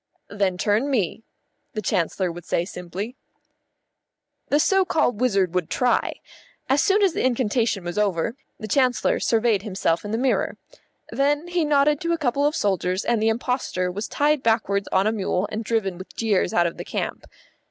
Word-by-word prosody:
"Then 200 -3 0
turn 210 +9 +1
me," 220 - 0 0.5
the 215 - -3
Chancellor 180 0 0
would 175 +1 -9
say 170 - -1
simply. 190 +6 -6 1.3
The 290 - +3
so 385 +5 +4
called 250 - 0
wizard 195 -8 +2
would 180 -3 -1
try. 250 -1 +1 0.5
As 275 +2 +3
soon 405 +1 +3
as 380 -4 +3
the - - -1
incantation 235 -5 +1
was 175 +3 -3
over, 205 +2 0 0.2
the 215 - -6
Chancellor 255 +2 +2
surveyed 225 -3 +2
himself 190 -5 -1
in 205 - -6
the 220 - -1
mirror. 255 +2 0 0.5
Then 290 +4 0
he 350 -1 +1
nodded 295 0 +3
to 335 0 0
a - - 0
couple 285 -1 +1
of 300 - -1
soldiers, 185 -1 0
and 235 -2 +1
the 220 - +3
impostor 225 -6 -1
was 205 +4 -4
tied 295 0 +1
backwards 220 -4 +1
on 190 +1 +3
to - - +3
a - - -1
mule 195 -2 -1
and 220 +2 -3
driven 200 -5 -1
with 185 - -11
jeers 210 -5 +1
out 175 - +3
of 170 - -2
the - - -5
camp. - - -4
220 Hz, 185 wpm, -23 LUFS, 190-265 Hz, 1.3 s, so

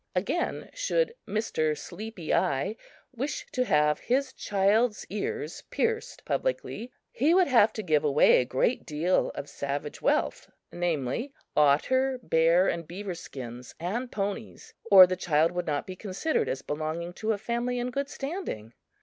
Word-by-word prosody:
Again, - - -1
should - - 0
(Mr.) 175 -8 0
Sleepy 185 +2 -5
Eye 140 +10 +1 0.4
wish 270 +4 -3
to 255 0 0
have 150 -5 +3
his 260 +2 0
child's 210 +3 +1
ears 440 - -3
pierced 460 -1 -2
publicly, 250 - -2 0.2
he 300 +8 +3
would 370 -1 +6
have 230 -7 +5
to 215 - -4
give 155 -4 +2
away 150 -2 +5
a - - -2
great 130 - 0
deal 160 +5 +1
of 140 - -5
savage 140 +1 -4
wealth - - 0 0.2
namely, 175 - -2 0.2
otter, 255 - +3
bear 165 +3 +4
and 170 -2 -2
beaver 190 +2 -5
skins 125 -6 -9
and 230 +9 -3
ponies 205 +2 -4 0.2
or 190 -2 +11
the 185 0 -2
child 165 -3 +2
would 175 -1 -3
not 145 -2 -1
be 185 - -7
considered 205 - -1
as 135 - -3
belonging 160 +3 -3
to 215 +4 -1
a 215 - 0
family 240 +3 -2
in 245 +1 -2
good 280 +2 -2
standing. 275 - -5
195 Hz, 150 wpm, -28 LUFS, 155-250 Hz, 0.4 s, or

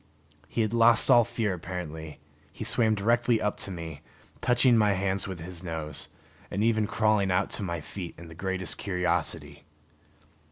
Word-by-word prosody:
He 115 - -1
had 110 0 -1
lost 115 -1 +5
all 120 - +7
fear 115 -3 -2
apparently; 80 -3 -7 0.3
he - - -7
swam 110 -2 +3
directly 115 +3 +2
up 105 -1 -1
to - - 0
me, 80 -5 -7 0.4
touching 125 0 +4
my 105 -2 +4
hands 95 +1 -1
with 95 -3 -6
his 90 +1 -7
nose, 80 -3 -2 0.4
and 100 - -1
even 110 -2 +2
crawling 105 -3 +2
out 90 0 +1
to - - 0
my 85 -4 -3
feet 90 +2 -8
in 85 - -11
the 80 - -11
greatest 95 +1 -2
curiosity. 90 -7 -1
95 Hz, 165 wpm, -28 LUFS, 85-110 Hz, 0.4 s, all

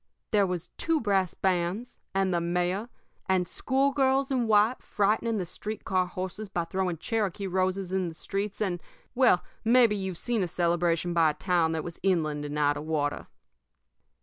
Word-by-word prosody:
There 205 -3 +4
was 180 -1 -4
two 330 -1 +1
brass 195 - +1
bands, 190 +6 -1 0.2
and 190 -1 +2
the 170 - +1
mayor, 180 +6 -1 0.4
and 185 -2 +2
schoolgirls 270 +2 +1
in 250 -3 +1
white 215 +3 +3
frightening 215 +2 +1
the 185 - -2
street 210 +5 -6
car 185 -1 +1
horses 185 +3 -5
by 175 -3 -1
throwing 185 -1 -1
Cherokee 200 0 -2
roses 185 0 -1
in 190 -1 0
the 165 - -7
streets, 200 +4 -4
and 180 -4 -1 0.3
well, 245 -8 +4 0.2
maybe 235 -2 +5
you've 190 -3 -3
seen 235 +1 0
a 180 - 0
celebration 170 0 +1
by 165 -2 +4
a - - -1
town 170 -4 +1
that 160 -1 -2
was 170 - -8
inland 155 -6 0
and 145 0 -4
out 145 -1 +2
of 150 - -6
water. 145 -2 -1
185 Hz, 175 wpm, -28 LUFS, 170-215 Hz, 0.4 s, maybe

